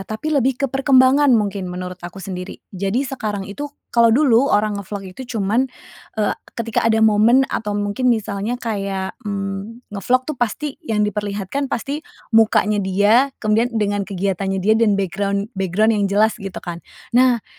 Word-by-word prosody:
tapi 220 Hz, +10 st, -4 dB
lebih 270 Hz, -1 st, +1 dB
ke -, -, +3 dB
perkembangan 270 Hz, +1 st, +4 dB
mungkin 200 Hz, -3 st, -2 dB
menurut 180 Hz, 0 st, -6 dB
aku 175 Hz, +1 st, -9 dB
sendiri. 180 Hz, -1 st, -6 dB, 0.2 s
Jadi 200 Hz, +8 st, -1 dB
sekarang 215 Hz, -7 st, -4 dB
itu 245 Hz, +10 st, -6 dB, 0.2 s
kalo 235 Hz, -1 st, +5 dB
dulu 260 Hz, +1 st, +4 dB
orang 205 Hz, -1 st, +1 dB
nge-vlog 195 Hz, -1 st, -7 dB
itu 245 Hz, +2 st, -7 dB
cuman, 220 Hz, +6 st, +1 dB, 0.5 s
eee, 215 Hz, -1 st, +1 dB, 0.2 s
ketika 230 Hz, -1 st, -1 dB
ada 220 Hz, 0 st, +3 dB
momen 220 Hz, +5 st, +5 dB
atau 210 Hz, -2 st, -2 dB
mungkin 205 Hz, +5 st, 0 dB
misalnya 220 Hz, 0 st, -1 dB
kayak, 195 Hz, -5 st, -3 dB, 0.2 s
mmm, 200 Hz, +4 st, -5 dB
nge-vlog 245 Hz, +6 st, +1 dB
tuh 305 Hz, -3 st, -5 dB
pasti, 275 Hz, -, -2 dB
yang 220 Hz, -10 st, 0 dB
diperlihatkan 210 Hz, +6 st, -3 dB
pasti 280 Hz, +3 st, -3 dB, 0.3 s
mukanya 215 Hz, -2 st, +4 dB
dia, 205 Hz, +7 st, +3 dB, 0.2 s
kemudian 215 Hz, +3 st, +2 dB
dengan 205 Hz, -2 st, -1 dB
kegiatannya 195 Hz, 0 st, -1 dB
dia 195 Hz, +3 st, +2 dB
dan 220 Hz, -3 st, +3 dB
background 200 Hz, +3 st, -2 dB
background 195 Hz, +3 st, +1 dB
yang 205 Hz, -2 st, +1 dB
jelas, 215 Hz, +2 st, +3 dB
gitu 195 Hz, -2 st, -7 dB
kan. 170 Hz, -1 st, -6 dB, 0.3 s
Nah, 245 Hz, -2 st, +4 dB
210 Hz, 155 wpm, -20 LUFS, 195-240 Hz, 0.5 s, kalo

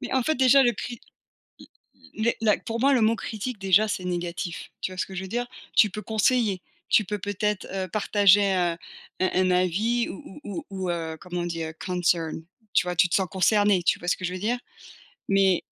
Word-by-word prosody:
Mais 255 Hz, -, -6 dB
en 260 Hz, -, +2 dB
fait 315 Hz, +6 st, +1 dB
déjà 265 Hz, +1 st, +5 dB
le 240 Hz, -2 st, +3 dB
cri 235 Hz, +2 st, -7 dB, 1.2 s
l 220 Hz, -, -3 dB
les 235 Hz, -, +2 dB
la 215 Hz, -3 st, +3 dB
pour 230 Hz, 0 st, -5 dB
moi 275 Hz, +3 st, +4 dB
le 250 Hz, -, +3 dB
mot 225 Hz, +1 st, +3 dB
«critique» 225 Hz, +2 st, -5 dB
déjà 195 Hz, +2 st, +3 dB
c'est 195 Hz, -3 st, -3 dB
négatif. 175 Hz, -1 st, -4 dB
Tu 185 Hz, -, -3 dB
vois 185 Hz, -, -10 dB
ce -, -, -1 dB
que 190 Hz, -, -10 dB
je 190 Hz, -, -4 dB
veux 190 Hz, -, -7 dB
dire? 240 Hz, +4 st, -2 dB, 0.3 s
Tu 210 Hz, -, +6 dB
peux 210 Hz, +3 st, -6 dB
conseiller, 220 Hz, -3 st, +1 dB, 0.3 s
tu 215 Hz, -, +4 dB
peux 210 Hz, +2 st, -3 dB
peut-être, 205 Hz, +1 st, -2 dB
heu, 190 Hz, -1 st, -3 dB
partager, 200 Hz, 0 st, +4 dB
heu, 175 Hz, -2 st, +1 dB, 0.4 s
un 185 Hz, -, +2 dB
un 185 Hz, 0 st, +2 dB
avis 195 Hz, +7 st, +1 dB
ou 190 Hz, +5 st, -10 dB
ou 200 Hz, -3 st, -5 dB
ou 190 Hz, -1 st, -5 dB
ou, -, -, -1 dB
heu, 165 Hz, -2 st, -3 dB
comment 180 Hz, -1 st, -4 dB
on -, -, -3 dB
dit 165 Hz, -1 st, -3 dB
a 160 Hz, -, -5 dB
concern 175 Hz, -2 st, -1 dB, 0.3 s
tu 180 Hz, -, +3 dB
vois? 180 Hz, 0 st, -2 dB
Tu 180 Hz, -, +4 dB
te -, -, -2 dB
sens 190 Hz, -2 st, +2 dB
concerné, 205 Hz, 0 st, +3 dB
tu -, -, +2 dB
vois 175 Hz, -, -6 dB
ce -, -, +2 dB
que 185 Hz, -, -9 dB
je 180 Hz, -, -3 dB
veux 185 Hz, -, -4 dB
dire? 235 Hz, +5 st, 0 dB, 0.7 s
Mais 195 Hz, -2 st, +3 dB
195 Hz, 230 wpm, -25 LUFS, 180-220 Hz, 1.2 s, Tu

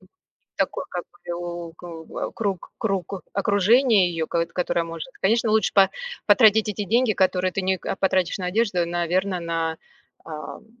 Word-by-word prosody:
Не -, -, -22 dB, 0.5 s
такой, -, -, -1 dB
как -, -, -4 dB
крю 175 Hz, -, -6 dB
ку 165 Hz, -2 st, -9 dB
э, -, -, -3 dB
круг, 200 Hz, -5 st, -3 dB
круг, 195 Hz, -4 st, -2 dB
э -, -, -2 dB, 0.2 s
окружение 205 Hz, 0 st, +4 dB
её, 165 Hz, -2 st, -2 dB
кот 170 Hz, 0 st, -1 dB
которое 175 Hz, -1 st, 0 dB
может. 165 Hz, +8 st, -7 dB
Конечно, 225 Hz, +3 st, +2 dB
лучше 215 Hz, -2 st, +2 dB
по 195 Hz, -1 st, +6 dB, 0.4 s
потратить 220 Hz, -2 st, +5 dB
эти 210 Hz, 0 st, -3 dB
деньги, 230 Hz, +3 st, +2 dB
которые 185 Hz, -1 st, +1 dB
ты 195 Hz, -, -2 dB
не, 190 Hz, 0 st, +1 dB
а, -, -, -2 dB
потратишь 190 Hz, -2 st, +1 dB
на 185 Hz, -, -4 dB
одежду, 190 Hz, -3 st, +1 dB
наверно, 175 Hz, +2 st, -1 dB
на, 165 Hz, -1 st, -2 dB, 0.5 s
ам, 155 Hz, +6 st, -8 dB
185 Hz, 165 wpm, -24 LUFS, 170-205 Hz, 0.5 s, по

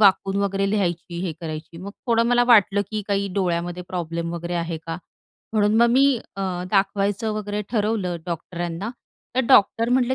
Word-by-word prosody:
वाकून 195 Hz, -1 st, +4 dB
वगैरे 195 Hz, 0 st, 0 dB
लिहायची 175 Hz, -4 st, -1 dB
हे 175 Hz, -4 st, -2 dB
करायची 160 Hz, 0 st, -6 dB
मग 195 Hz, +3 st, -7 dB, 0.2 s
थोडं 230 Hz, -1 st, +3 dB
मला 245 Hz, 0 st, +4 dB
वाटलं 205 Hz, -4 st, +5 dB
की 215 Hz, -, -2 dB
काही 200 Hz, 0 st, +1 dB
डोळ्यामध्ये 175 Hz, -1 st, -1 dB
प्रॉब्लेम 170 Hz, -1 st, -3 dB
वगैरे 170 Hz, +1 st, -4 dB
आहे 170 Hz, -1 st, -2 dB
का? 165 Hz, 0 st, -3 dB, 0.6 s
म्हणून 210 Hz, 0 st, +3 dB
मग 235 Hz, -, +6 dB
मी 270 Hz, +3 st, +5 dB, 0.3 s
अ, 195 Hz, -, -4 dB, 0.3 s
दाखवायचं 200 Hz, +2 st, +1 dB
वगैरे 210 Hz, 0 st, -3 dB
ठरवलं 210 Hz, -6 st, 0 dB
डॉक्टरांना 175 Hz, +3 st, -4 dB, 0.5 s
तर 260 Hz, -, +5 dB
डॉक्टर 230 Hz, -1 st, +5 dB
म्हटले 255 Hz, 0 st, +3 dB
195 Hz, 160 wpm, -23 LUFS, 175-215 Hz, 0.6 s, मग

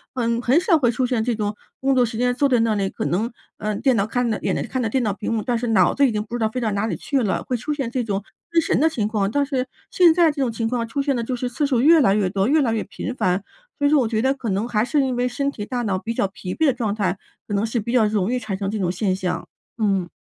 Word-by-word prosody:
嗯， 235 Hz, -1 st, 0 dB
很 255 Hz, +7 st, +4 dB
少 355 Hz, -4 st, +4 dB
会 240 Hz, -3 st, +3 dB
出 250 Hz, +2 st, 0 dB
现 240 Hz, -3 st, 0 dB
这 240 Hz, -1 st, 0 dB
种 210 Hz, -1 st, -2 dB, 0.2 s
工 270 Hz, 0 st, +2 dB
作 250 Hz, -, +4 dB
时 225 Hz, -1 st, -5 dB
间， 245 Hz, 0 st, +2 dB
坐 280 Hz, +2 st, +2 dB
在 245 Hz, -2 st, +3 dB
那 225 Hz, -1 st, +2 dB
里， 195 Hz, -1 st, 0 dB
可 -, -, -5 dB
能 215 Hz, +8 st, 0 dB, 0.3 s
呃， 215 Hz, 0 st, -2 dB
电 260 Hz, +4 st, +2 dB
脑 200 Hz, -1 st, +2 dB
看 245 Hz, 0 st, 0 dB
着 215 Hz, -, -2 dB
眼 -, -, 0 dB
睛 -, -, -3 dB
看 260 Hz, -, -2 dB
着 220 Hz, -, 0 dB
电 260 Hz, +1 st, 0 dB
脑 210 Hz, -, +1 dB
屏 210 Hz, +3 st, -4 dB
幕， 220 Hz, -, 0 dB
但 245 Hz, -2 st, 0 dB
是 240 Hz, +1 st, -3 dB
脑 225 Hz, -, +4 dB
子 280 Hz, -1 st, +4 dB
已 -, -, 0 dB
经 210 Hz, 0 st, -1 dB
不 230 Hz, -, -13 dB
知 240 Hz, -, -2 dB
道 220 Hz, -1 st, +1 dB
飞 250 Hz, -, -4 dB
到 220 Hz, -2 st, 0 dB
哪 200 Hz, +2 st, 0 dB
里 -, -, -2 dB
去 275 Hz, -3 st, -1 dB
了， 195 Hz, -, -1 dB
会 250 Hz, -, -2 dB
出 275 Hz, +7 st, -4 dB
现 270 Hz, -5 st, -3 dB
这 250 Hz, -1 st, -1 dB
种 200 Hz, -2 st, -2 dB, 0.3 s
失神 330 Hz, -2 st, +2 dB
的 320 Hz, -, +4 dB
情 215 Hz, -9 st, -1 dB
况。 205 Hz, -3 st, 0 dB
但 285 Hz, +4 st, +1 dB
是 260 Hz, -2 st, -2 dB, 0.2 s
现 355 Hz, -3 st, +6 dB
在 335 Hz, -2 st, +4 dB
这 285 Hz, -, -4 dB
种 250 Hz, -3 st, +1 dB
情 225 Hz, 0 st, -2 dB
况， 235 Hz, -1 st, -1 dB
出 275 Hz, +4 st, -2 dB
现 275 Hz, -2 st, +1 dB
的 235 Hz, -, -1 dB
就 255 Hz, +2 st, -2 dB
是 250 Hz, +1 st, -3 dB
次 265 Hz, +4 st, -1 dB
数 255 Hz, -4 st, +1 dB
越 320 Hz, +3 st, +7 dB
来 195 Hz, -6 st, +4 dB
越 195 Hz, -3 st, +1 dB
多， 195 Hz, +1 st, +1 dB
越 300 Hz, +3 st, +4 dB
来 230 Hz, -3 st, +1 dB
越 220 Hz, -, -1 dB
频 255 Hz, -, -6 dB
繁， 185 Hz, -1 st, 0 dB, 0.3 s
所 285 Hz, -, 0 dB
以 -, -, +3 dB
说 300 Hz, -, +5 dB
我 240 Hz, -, +1 dB
觉 220 Hz, -1 st, 0 dB
得， 265 Hz, +1 st, +3 dB
可 240 Hz, -5 st, -5 dB
能 200 Hz, +5 st, -1 dB
还 215 Hz, -2 st, +1 dB
是 290 Hz, +2 st, +2 dB
因 260 Hz, -2 st, 0 dB
为 250 Hz, +1 st, +1 dB
身 275 Hz, +3 st, -1 dB
体、 205 Hz, -5 st, -6 dB
大 245 Hz, 0 st, -3 dB
脑 195 Hz, -4 st, 0 dB
比 230 Hz, +3 st, -4 dB
较 200 Hz, -, +1 dB
疲 185 Hz, -1 st, -7 dB
惫 320 Hz, -, +2 dB
的 270 Hz, -, +4 dB
状 220 Hz, -4 st, -2 dB
态， 195 Hz, -2 st, -1 dB, 0.3 s
可 205 Hz, -, -4 dB
能 200 Hz, +1 st, +1 dB
是 230 Hz, +1 st, -1 dB
比 235 Hz, +3 st, -4 dB
较 230 Hz, -4 st, +4 dB
容 210 Hz, 0 st, 0 dB
易 250 Hz, -, 0 dB
产 210 Hz, -5 st, -4 dB
生 195 Hz, -1 st, -2 dB
这 215 Hz, -, -3 dB
种 180 Hz, -2 st, 0 dB
现 185 Hz, +1 st, 0 dB
象， 185 Hz, -1 st, -3 dB, 0.3 s
嗯。 195 Hz, -5 st, 0 dB
230 Hz, 345 characters per minute, -22 LUFS, 210-260 Hz, 0.3 s, 越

